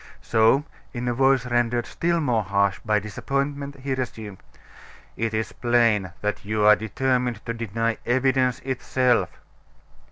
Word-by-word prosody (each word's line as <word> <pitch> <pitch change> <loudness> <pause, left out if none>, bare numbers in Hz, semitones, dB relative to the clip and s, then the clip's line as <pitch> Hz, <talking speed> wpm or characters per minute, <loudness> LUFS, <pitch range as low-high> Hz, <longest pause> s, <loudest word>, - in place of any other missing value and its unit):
So, 115 +6 +3 0.3
in 125 -1 -4
a 120 - +1
voice 135 0 +3
rendered 120 -1 0
still 170 0 -1
more 125 -8 +1
harsh 100 -1 0
by 110 -2 +2
disappointment, 140 +6 -3
he 135 0 -2
resumed: 110 -6 -5 0.8
"It 115 0 -1
is 110 0 -2
plain 115 -6 +2
that 105 0 -2
you 105 +1 0
are 105 0 +8
determined 125 +1 -1
to 115 - -2
deny 115 0 -2
evidence 130 0 +1
itself." 130 -1 +1
120 Hz, 135 wpm, -24 LUFS, 110-130 Hz, 0.8 s, are